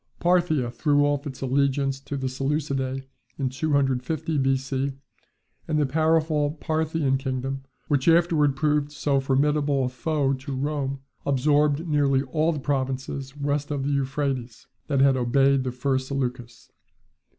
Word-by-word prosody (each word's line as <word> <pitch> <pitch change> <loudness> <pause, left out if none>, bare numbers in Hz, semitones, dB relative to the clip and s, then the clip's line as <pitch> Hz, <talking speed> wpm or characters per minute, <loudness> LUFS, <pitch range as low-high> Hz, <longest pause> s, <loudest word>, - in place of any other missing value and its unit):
Parthia 170 -8 +2
threw 145 +3 +2
off 145 0 0
its 130 -2 -8
allegiance 135 0 +1
to 140 +1 -5
the 130 -1 -2
Seleucidae 135 0 -2 0.3
in 135 -2 -1
250 140 +2 0
B.C., 135 0 0 0.7
and 155 - 0
the 150 - +3
powerful 155 0 +1
Parthian 155 -3 0
kingdom, 135 0 -3 0.3
which 140 -1 +1
afterwards 165 -4 +4
proved 150 0 +1
so 145 -2 0
formidable 140 +1 +1
a - - -1
foe 140 +2 0
to 135 +1 -5
Rome, 140 -1 -2 0.2
absorbed 145 +3 +2
nearly 140 -3 +2
all 155 +5 +1
the 150 - -3
provinces 135 0 -3
west 145 0 -1
of 145 -2 -2
the 140 - -1
Euphrates, 135 -4 -2 0.2
that 140 -3 +1
had 135 -1 +5
obeyed 135 +2 +3
the 130 - -2
first 130 +1 -1
Seleucus. 125 -4 -4
140 Hz, 140 wpm, -25 LUFS, 135-150 Hz, 0.7 s, had